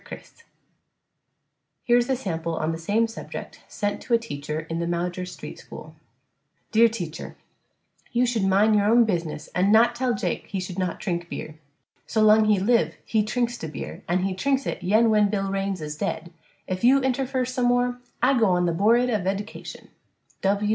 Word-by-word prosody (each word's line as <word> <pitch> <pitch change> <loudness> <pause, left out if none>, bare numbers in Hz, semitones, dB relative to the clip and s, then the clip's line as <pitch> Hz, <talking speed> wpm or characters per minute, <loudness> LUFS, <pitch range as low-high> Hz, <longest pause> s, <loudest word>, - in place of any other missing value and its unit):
CHRIS 465 - -12 1.4
Here 240 0 +4
is 240 +2 -1
a 265 - +2
sample 170 -8 -3
on 160 0 -1
the 165 - -4
same 210 +7 +1
subject 225 - -8
sent 205 0 -3
to 235 - +1
a - - +5
teacher 155 -9 -5
in 165 +1 -5
the 170 - -2
Maujer 175 +1 -2
Street 180 - -9
school: - - -11 0.8
Dear 230 +1 +6
Teacher: 175 -8 -6 0.7
You 245 0 +2
should 235 -4 0
mine 200 +3 +4
your 205 -1 +3
own 235 +2 +5
bizniss 170 -7 -3
an' 190 +3 +2
not 230 +2 +5
tell 245 0 0
Jake - - -3
he 195 - -3
should 185 0 -5
not 185 -2 -2
trink 175 -3 -3
bier, 155 0 -7 0.5
so 220 -1 +1
long 215 0 +6
he 210 -2 +3
lif 230 +5 +2
he 220 - +1
trinks 240 +2 -1
the 160 - -5
bier 155 - -7
an' 180 +2 +1
he 195 0 0
trinks 270 +7 0
it - - -3
yen 215 +5 +3
wen 210 -1 +4
bill 195 -1 -1
rains 195 -2 -2
is 150 0 -5
ded, 170 +2 -4 0.3
if 185 +2 -4
you 265 +3 +6
interfer 260 -1 0
some 255 -1 -1
more 245 0 +1 0.2
I 260 0 +4
go 220 - +4
on 180 -1 +2
the 170 - +1
bored 230 +7 +3
of 215 -3 0
edcation. 200 +3 -5
210 Hz, 190 wpm, -24 LUFS, 180-235 Hz, 1.4 s, Dear